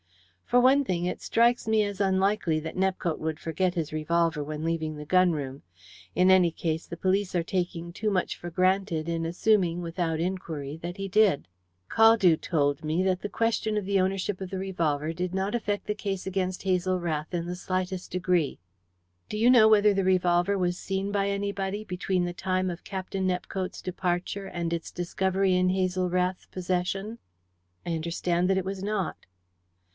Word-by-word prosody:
"For 245 - +4
one 265 +3 +5
thing, 175 -7 -1
it 180 - -3
strikes 235 0 +2
me 220 -1 +3
as 205 -1 -3
unlikely 190 -4 +2
that 160 - -6
Nepcote 185 -3 0
would 160 0 -3
forget 180 +3 -1
his 160 -3 -2
revolver 165 0 +1
when 155 +1 -5
leaving 160 -2 -2
the 150 - -7
gun 185 +3 +4
room. 140 -3 -4 0.5
In 185 +1 +4
any 185 -2 +6
case, 160 0 -3
the 170 - -7
police 190 +1 0
are 170 - +2
taking 175 -1 -3
too 215 +4 -1
much 185 -3 0
for 175 - -7
granted 185 -2 +1
in 165 -1 -1
assuming, 175 0 +2
without 165 -1 -2
inquiry, 165 -5 -3
that 175 +3 -5
he 195 0 -3
did. 200 -6 +3 0.4
Caldew 225 -6 +6
told 145 -3 0
me 155 +3 0
that 185 -1 +1
the 205 - -4
question 220 -1 0
of 205 - -2
the 195 -1 +2
ownership 190 +1 -1
of 190 - -4
the 190 - -4
revolver 165 -5 -1
did 180 +2 -3
not 195 +3 -1
affect 205 -3 -2
the 210 - -1
case 195 -3 -4
against 185 -1 -2
Hazel 185 -1 +1
Rath 155 -3 -3
in 170 -1 -1
the 175 +1 -4
slightest 185 0 -3
degree." 180 -5 0 0.7
"Do 210 - -3
you 230 +3 +4
know 230 -4 +7
whether 210 -1 +5
the 195 0 +1
revolver 180 +1 +2
was 180 -1 0
seen 195 +1 -3
by 200 -1 +1
anybody 200 +1 -2
between 180 -1 -1
the 175 - -3
time 185 +1 -1
of 175 0 -6
Captain 190 0 -3
Nepcote's 185 +1 -3
departure 185 +2 -2
and 170 -2 -3
its 165 -1 -4
discovery 190 +2 0
in 180 0 +3
Hazel 185 -1 0
Rath's 180 +1 -1
possession?" 185 +4 -2 0.7
"I 175 - -2
understand 170 +2 0
that 190 - +3
it 190 - -1
was 195 0 -4
not." 205 -4 -1
185 Hz, 180 wpm, -27 LUFS, 170-195 Hz, 0.7 s, know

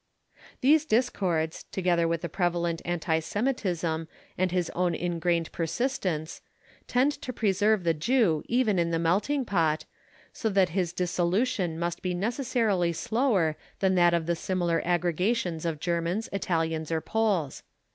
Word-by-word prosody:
These 300 +4 +5
discords, 185 - 0
together 175 -3 +1
with 165 -1 -1
the 170 - -3
prevalent 170 -1 -1
anti 165 -2 0
Semitism 175 -6 -1 0.3
and 185 -1 0
his 180 -2 0
own 175 -1 0
ingrained 170 -1 -1
persistence, 170 - -2 0.5
tend 255 +4 +3
to 255 - -4
preserve 210 -2 +2
the 165 -1 +2
Jew 165 - +2
even 230 -6 +2
in 170 -1 +1
the 165 - 0
"Melting 205 - +1
Pot," 165 -6 +1 0.5
so 225 - -1
that 195 -3 +3
his 175 -1 -1
dissolution 180 +1 0
must 170 0 -3
be 180 -1 -2
necessarily 220 -4 0
slower 205 - +1 0.2
than 190 -1 +2
that 175 -1 +4
of 165 -1 -1
the 170 +1 0
similar 175 -1 0
aggregations 175 0 0
of 160 -3 -3
Germans, 175 +6 -1
Italians, 165 -4 -1
or 160 - +1
Poles. 200 -11 0
175 Hz, 140 wpm, -27 LUFS, 165-210 Hz, 0.5 s, These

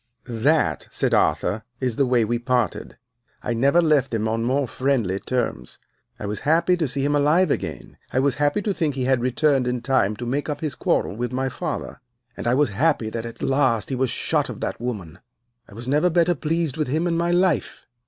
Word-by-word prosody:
"'That,' 130 +7 +1
said - - 0
Arthur, 110 +2 +1 0.2
'is 125 -4 -1
the 135 +1 +2
way 120 -3 +3
we 120 +2 -1
parted. 120 -4 -1 0.5
I 120 - -1
never 140 +9 +3
left 140 -6 +2
him 110 0 0
on 115 +1 -1
more 130 +3 +1
friendly 120 -8 0
terms. 120 - -3 0.4
I - - -5
was 105 +1 -3
happy 170 +4 +3
to 160 -3 0
see 135 +1 -1
him 145 +1 +1
alive 150 +4 +3
again, - - -4
I 130 - +1
was 140 0 +2
happy 145 +8 +2
to 205 - 0
think 155 -7 -1
he 130 - -2
had 130 -2 +2
returned 130 +1 +2
in 125 -1 -1
time 115 -6 +2
to 120 - -6
make 140 +5 -2
up 145 - -3
his 155 -4 -2
quarrel - - 0
with 120 +2 -3
my 130 +1 -1
father, - - -5 0.3
and - - -5
I 120 - +3
was 145 -1 +3
happy 120 -1 +1
that 115 0 -4
at 115 0 -9
last 130 -5 +1
he 135 - -1
was 130 0 0
shut - - 0
of - - -7
that - - -3
woman. 95 -9 -5 0.5
I 100 - -13
was 120 +2 -8
never 150 +6 +3
better 175 +1 +3
pleased 160 -1 -1
with 155 - 0
him 155 +6 0
in 170 -1 0
my 170 +1 0
life. 175 -2 +1
130 Hz, 215 wpm, -23 LUFS, 120-150 Hz, 0.5 s, way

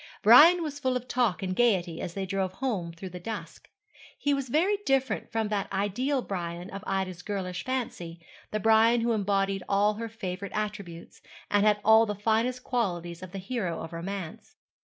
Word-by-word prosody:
Brian 315 - +8
was 290 -2 -5
full 260 -2 +1
of 250 0 -9
talk 240 -7 0
and 185 -1 -2
gaiety 185 -8 +1
as 170 - -5
they 195 -1 -2
drove 190 -1 -2
home 195 -8 -2
through 180 +2 -9
the 180 - -7
dusk. 220 +5 -7 0.5
He 285 - +1
was 275 -2 -2
very 360 +10 +2
different 270 -3 0
from 225 -2 -1
that 205 -2 -2
ideal 240 +8 0
Brian 175 -1 -5
of 195 0 -7
Ida's 190 -2 -2
girlish 180 -3 -4
fancy 200 -10 -4 0.3
the 215 - -2
Brian 225 +2 +4
who 235 +1 +1
embodied 195 -2 0
all 205 +1 +3
her 225 +2 -5
favourite 195 -3 -6
attributes, 200 -5 -5 0.3
and 205 +1 +4
had 210 -1 +3
all 220 +1 +6
the 210 - -2
finest 225 +5 0
qualities 175 -8 -2
of 185 -1 -9
the 195 - -6
hero 190 -3 -3
of 165 +1 -7
romance. 180 0 -6
205 Hz, 180 wpm, -28 LUFS, 185-240 Hz, 0.5 s, Brian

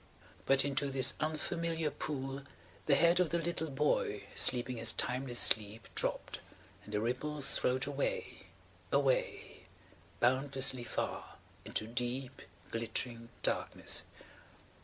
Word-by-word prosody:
But 135 0 +3
into 140 0 -1
this 135 -1 +5
unfamiliar 160 +1 -2
pool 135 -2 -4 0.5
the 140 - +5
head 170 +4 +4
of 180 -3 +2
the 170 - 0
little 165 -1 -3
boy 135 -7 0
sleeping 125 0 +4
his 115 0 +3
timeless 125 -1 0
sleep 110 0 +2
dropped–and 105 - -5
the 105 - 0
ripples 135 +5 0
flowed 130 +1 0
away, - - -3 0.4
away–boundlessly 135 - 0
far–into 110 - -5
deep 125 +3 -3 0.3
glittering 115 +1 -3
darkness. - - 0
135 Hz, 100 wpm, -33 LUFS, 120-150 Hz, 0.5 s, this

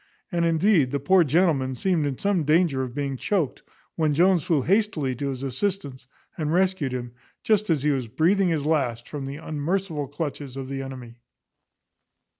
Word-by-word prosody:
and, 170 -2 +1
indeed, 165 -3 +3
the 140 - -1
poor 180 +6 +4
gentleman 145 -4 +2
seemed 165 +1 +1
in 135 -3 -3
some 200 -5 +1
danger 155 -2 +2
of 125 -1 -5
being 140 -2 -2
choaked, 165 +1 -1 0.3
when 155 -3 +1
Jones 180 +2 +4
flew 150 -6 +1
hastily 185 - +1
to 140 +3 -3
his 135 -1 -5
assistance, 140 - -3 0.3
and 155 -2 -2
rescued 180 -5 +1
him, 120 -1 -4 0.3
just 215 -2 +2
as 155 -5 +1
he 150 - +3
was 130 -4 -1
breathing 175 - +2
his 155 -4 -1
last, 130 -7 0
from 140 -3 -6
the 135 - -5
unmerciful 160 0 -2
clutches 145 -2 -5
of 135 -1 -6
the 135 0 -3
enemy. 130 -3 -8
150 Hz, 175 wpm, -25 LUFS, 135-175 Hz, 0.3 s, poor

